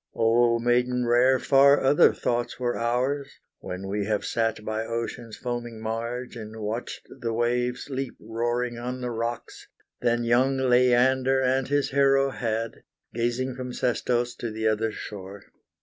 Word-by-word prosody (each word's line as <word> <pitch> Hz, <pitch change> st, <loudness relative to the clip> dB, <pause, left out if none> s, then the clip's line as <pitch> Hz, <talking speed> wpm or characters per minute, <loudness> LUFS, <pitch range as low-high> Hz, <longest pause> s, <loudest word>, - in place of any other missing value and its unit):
O, 115 Hz, +1 st, +3 dB
maiden 125 Hz, +1 st, +1 dB
rare, 125 Hz, +2 st, +4 dB
far 140 Hz, +2 st, +5 dB
other 135 Hz, +2 st, +5 dB
thoughts 120 Hz, +1 st, -2 dB
were 120 Hz, -1 st, -1 dB
ours, 130 Hz, +4 st, -1 dB, 0.3 s
When 90 Hz, +2 st, -6 dB
we 100 Hz, +1 st, -2 dB
have 105 Hz, -1 st, -1 dB
sat 115 Hz, -2 st, -1 dB
by 110 Hz, 0 st, -2 dB
ocean's 115 Hz, 0 st, -5 dB
foaming 120 Hz, -2 st, -5 dB
marge, 115 Hz, +3 st, -4 dB
And 110 Hz, -1 st, -8 dB
watched 110 Hz, +3 st, -5 dB
the 115 Hz, -2 st, -2 dB
waves 120 Hz, +1 st, -1 dB
leap 135 Hz, -2 st, -4 dB
roaring 120 Hz, +2 st, -2 dB
on 125 Hz, +1 st, -5 dB
the 125 Hz, -1 st, -3 dB
rocks, 115 Hz, +1 st, -5 dB, 0.3 s
Than 120 Hz, 0 st, +1 dB
young 125 Hz, +3 st, +3 dB
Leander 130 Hz, +1 st, +3 dB
and 130 Hz, 0 st, +1 dB
his 145 Hz, +1 st, 0 dB
Hero 135 Hz, 0 st, +3 dB
had, 115 Hz, -2 st, -3 dB, 0.3 s
Gazing 120 Hz, +2 st, -1 dB
from 125 Hz, 0 st, -6 dB
Sestos 120 Hz, 0 st, 0 dB
to 120 Hz, -, -4 dB
the 110 Hz, 0 st, -2 dB
other 110 Hz, +1 st, +1 dB
shore. 100 Hz, -1 st, -8 dB
120 Hz, 150 wpm, -26 LUFS, 115-125 Hz, 0.3 s, far